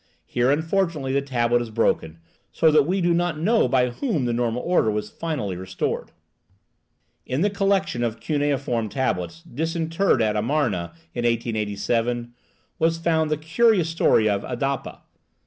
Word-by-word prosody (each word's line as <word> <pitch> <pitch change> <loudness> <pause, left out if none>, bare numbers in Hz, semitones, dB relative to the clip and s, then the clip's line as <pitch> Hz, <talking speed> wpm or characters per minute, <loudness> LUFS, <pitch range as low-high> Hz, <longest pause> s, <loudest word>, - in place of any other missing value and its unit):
Here, 120 +1 +1
unfortunately, 160 -2 0
the 140 - +2
tablet 120 -3 +1
is 120 - -5
broken, 85 -7 0 0.3
so 160 - +3
that 150 -1 +4
we 190 +2 0
do 175 0 +3
not 175 -2 0
know 220 +9 +3
by 125 -2 +2
whom 165 - -1
the 120 - 0
normal 120 0 -1
order 175 -10 +2
was 105 0 -3
finally 140 - -3
restored. 95 +1 -3 1.1
In 130 +4 -2
the 205 +2 +2
collection 195 - 0
of 115 -1 -2
cuneiform 140 -6 -1
tablets 130 - -2
disinterred 165 +2 0
at 105 -1 +1
Amarna 110 - 0 0.2
in 120 - -3
1887 115 +1 -1 0.5
was 165 0 +2
found 160 -2 +1
the 155 - 0
curious 165 +3 +2
story 140 -9 +3
of 100 -1 +1
Adapa. 135 +2 -3
135 Hz, 145 wpm, -23 LUFS, 115-165 Hz, 1.1 s, that